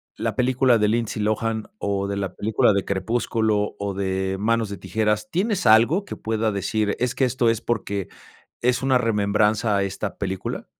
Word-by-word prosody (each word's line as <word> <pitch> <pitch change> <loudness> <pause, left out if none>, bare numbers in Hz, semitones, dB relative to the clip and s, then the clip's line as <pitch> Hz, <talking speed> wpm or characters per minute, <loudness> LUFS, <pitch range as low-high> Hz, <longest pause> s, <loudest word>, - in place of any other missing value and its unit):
la - - -2
película 125 -1 +3
de 105 -1 +2
Lindsay 110 -1 -1
Lohan 110 +1 -1
o 100 -1 -1
de 100 - -2
la 95 -1 -3
película 110 +1 +2
de 100 -2 0
Crepúsculo 110 +1 0
o 100 -1 -2
de 95 0 -2
Manos 115 +1 +1
de 100 - -6
tijeras", 105 +2 -1
¿tienes 190 +1 -1
algo 120 - +5
que - - -6
pueda 110 0 -1
decir, 105 +1 -1
es 125 0 -1
que 135 - +2
esto 125 -1 +1
es 115 -2 +1
porque 100 -5 -2 0.5
es 125 +1 +1
una 130 -1 +3
remembranza 105 -1 +1
a 100 - +1
esta 100 +1 -4
película? 95 -1 -4
110 Hz, 180 wpm, -23 LUFS, 100-120 Hz, 0.5 s, algo